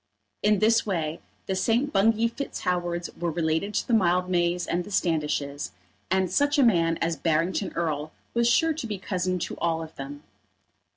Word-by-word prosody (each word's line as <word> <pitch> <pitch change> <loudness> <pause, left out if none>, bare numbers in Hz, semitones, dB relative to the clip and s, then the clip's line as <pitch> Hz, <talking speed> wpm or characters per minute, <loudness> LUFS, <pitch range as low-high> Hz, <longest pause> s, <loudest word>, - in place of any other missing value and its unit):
In 210 0 +4
this 225 +3 +4
way 165 -6 -2 0.3
the 190 - -1
St. 240 +9 +1
Bungay 225 +3 +3
Fitz 280 +4 -5
Howards 175 -1 -1
were 175 0 0
related 165 +5 -1
to - - 0
the 240 - 0
Mildmays 180 -3 +2
and 175 +1 0
Standishes, 150 - -1 0.4
and 190 -1 +1
such 285 +8 +2
a 280 - +5
man 165 -8 +3
as 165 0 0
Barrington 165 +5 0
Erle 155 -3 -1 0.2
was 235 0 +3
sure 320 +7 +3
to 295 -6 -5
be 210 -2 -3
cousin 185 -1 -1
to 175 - -4
all 165 -1 0
of 160 - -11
them. 140 +2 -7
180 Hz, 170 wpm, -26 LUFS, 165-215 Hz, 0.4 s, a